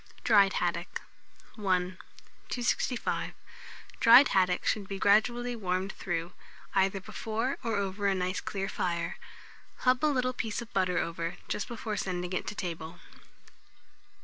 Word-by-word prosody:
DRIED 200 -3 +5
HADDOCK. - - -1 0.6
I. - - -8
265. 190 +6 -2 0.7
Dried 245 +5 +9
haddock 180 -1 +2
should 205 -3 0
be 195 - -4
gradually 240 +5 +3
warmed 190 -2 -1
through, 175 -1 -3 0.4
either 195 0 +2
before 225 +6 -3
or 230 -2 0
over 200 0 -1
a 195 - +2
nice 185 0 -1
clear 195 -1 -3
fire. 175 -4 -2 0.6
Hub 255 +2 +3
a - - +5
little 255 -3 +1
piece 225 -3 -3
of 235 -1 -8
butter 185 -2 +1
over, 165 +1 -2
just - - -2
before 220 -3 -4
sending 180 -1 -3
it - - -2
to - - -4
table. 165 -3 -5
195 Hz, 135 wpm, -30 LUFS, 180-230 Hz, 0.7 s, Dried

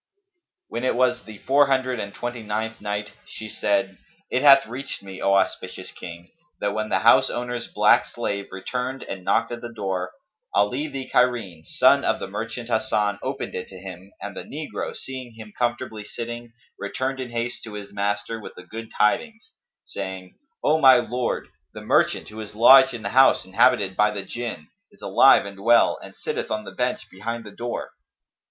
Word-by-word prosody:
When 120 - -4
it 130 - +1
was 125 0 +1
the 110 -1 -10
Four 140 +6 +3
Hundred 130 -2 +1
and 100 -1 -4
Twenty 120 +2 -5
ninth 110 +1 -3
Night, 105 0 -3 0.2
She 110 - -8
said, 100 -2 -1 0.3
It 125 - +1
hath 140 -1 +8
reached 130 0 -7
me, 95 -1 -9
O 100 0 +3
auspicious 95 -1 -1
King, 85 0 -10 0.3
that 100 0 -1
when 110 0 -2
the - - +1
house 115 +2 +6
owner's 120 -1 -3
black - - +4
slave 100 -1 -3
returned 125 +7 -4
and 95 -1 -7
knocked - - +1
at 120 0 -5
the 120 - -7
door, 95 -4 -3 0.4
Ali 125 +9 +2
the 135 -3 -6
Cairene, 115 -12 +1
son - - +4
of - - +1
the - - -5
merchant 115 +4 -5
Hasan, 105 -3 0
opened 135 +1 -4
it 90 - -5
to 95 - -12
him 95 +1 -10
and 100 -1 -7
the - - -5
negro, 150 +1 -5
seeing 130 -3 -8
him 110 -2 -11
comfortably 120 -3 -2
sitting, 120 +2 -7 0.3
returned 130 +6 -3
in 130 -2 -4
haste 120 +1 -3
to 110 - -9
his 100 -1 -8
master 105 +2 -2
with - - -10
the 90 - -11
good 110 +5 -8
tidings, 225 - 0 0.3
saying, 95 -1 -6 0.3
"O 155 +1 +3
my 130 -3 +8
Lord, 120 0 -2 0.3
the - - -7
merchant, - - +2
who 110 +1 -9
is 105 -1 -9
lodged 130 +3 +8
in 115 - -8
the 100 - -2
house 135 -2 +5
inhabited 100 0 +3
by 105 +2 +4
the 100 -2 -4
Jinn,[FN#272] 115 -6 -5 0.3
is - - -20
alive - - +6
and 100 -1 -9
well 115 +4 +4
and - - -11
sitteth - - -4
on 110 0 -2
the - - -8
bench 125 0 -2
behind 115 +5 -5
the 105 - -10
door." 120 +3 -5
110 Hz, 185 wpm, -24 LUFS, 100-125 Hz, 0.4 s, hath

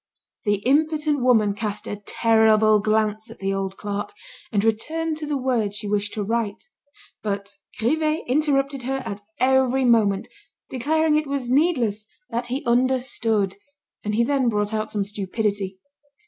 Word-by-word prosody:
The 205 -1 +3
impotent 300 +1 +2
woman 225 -5 +4
cast 210 0 -4
a - - -4
terrible 220 -1 +4
glance 215 +1 0
at 230 - -11
the 195 0 -1
old 195 0 -3
clerk, 205 0 -4 0.4
and 205 -3 +1
returned 310 +9 -1
to 305 -1 -5
the 290 -1 0
word 240 -6 0
she 210 0 -5
wished 205 +1 -1
to 210 - -1
write. 220 -1 -2 0.6
But 200 -1 -3 0.3
Grivet 310 +7 +1
interrupted 275 0 +1
her 265 +1 -2
at 200 +1 -5 0.2
every 265 0 +3
moment, 215 -5 +3 0.4
declaring 305 +4 +2
it 305 -1 -1
was 275 -3 -2
needless, 250 - +2 0.2
that 240 +1 -2
he 265 +4 -3
understood, 235 -5 +1 0.5
and 210 0 -1
he 235 - +3
then 265 -1 +2
brought 210 -1 -1
out 215 0 -1
some 205 -2 -1
stupidity. 200 -1 -2
230 Hz, 150 wpm, -23 LUFS, 210-270 Hz, 0.6 s, woman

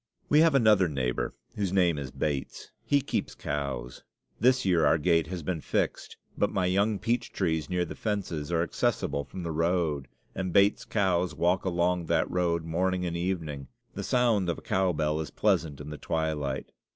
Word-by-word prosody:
We 150 - +5
have 160 -2 +5
another 105 -7 +5
neighbor, 65 -4 -2 0.2
whose 100 -3 -1
name 90 -5 +3
is 70 -2 -5
Bates; 70 -1 -4
he 140 -1 +2
keeps 135 - -3
cows. 70 -4 -4 0.4
This 130 +1 +3
year 90 -4 +3
our 75 +2 +4
gate 80 0 +2
has 90 -2 -5
been 80 0 -2
fixed; - - -2 0.2
but - - +1
my 95 - 0
young 100 +4 +2
peach 120 +3 -1
trees 80 -6 -1
near 90 -1 0
the - - -7
fences 90 -8 -3
are 85 -1 +2
accessible 70 -3 -1
from 90 +4 -8
the 85 - -3
road; 80 -3 0 0.3
and 95 -1 -3
Bates's 100 +3 +3
cows 90 -5 +1
walk 90 +5 +1
along 90 -1 +1
that - - +2
road 85 -2 +1
morning 90 +2 0
and 85 -1 -2
evening. 85 -6 -3 0.3
The - - -5
sound 115 -7 +2
of 85 - -1
a - - -10
cow 95 -1 +1
bell 75 -1 0
is 80 -3 -4
pleasant 75 -4 0
in 75 +1 -7
the 75 - -7
twilight. 75 -4 -2
85 Hz, 185 wpm, -28 LUFS, 75-95 Hz, 0.4 s, We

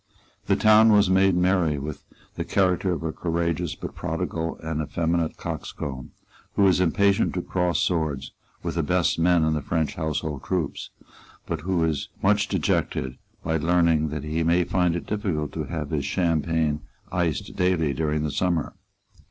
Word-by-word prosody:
The - - +4
town 110 +1 +6
was 105 -2 +5
made 95 0 +4
merry 90 -4 +2
with 75 +1 -6 0.3
the - - -3
character 95 -1 +1
of 85 -2 -3
a 80 - -1
courageous 85 -1 -1
but - - -7
prodigal 80 0 -3
and 80 -1 -2
effeminate 85 +1 -1
coxcomb, 65 -3 -5 0.5
who 100 - +4
is 95 -2 +4
impatient 100 +4 +2
to 90 - -2
cross 90 -2 0
swords 80 -6 -1 0.3
with - - -2
the 85 - 0
best 90 +2 +1
men 85 0 +4
in 80 0 +2
the 75 - -1
French 80 +1 -1
household 80 -2 -3
troops, 90 -6 -2 0.6
but 80 -2 -3
who 90 0 0
is 80 -4 -1
much - - +3
dejected 65 0 -1 0.2
by 80 0 0
learning 85 -1 +2
that 75 -1 -4
he 80 +2 -1
may 85 +2 +3
find 90 -1 +1
it 85 - -4
difficult 95 -9 -2
to 80 -2 -4
have 75 -1 -5
his 75 -3 0
champagne 80 -2 0 0.3
iced 85 -4 -1
daily 90 -5 +1
during 75 +1 -1
the 75 - -1
summer. 85 -3 0
85 Hz, 165 wpm, -25 LUFS, 75-90 Hz, 0.6 s, town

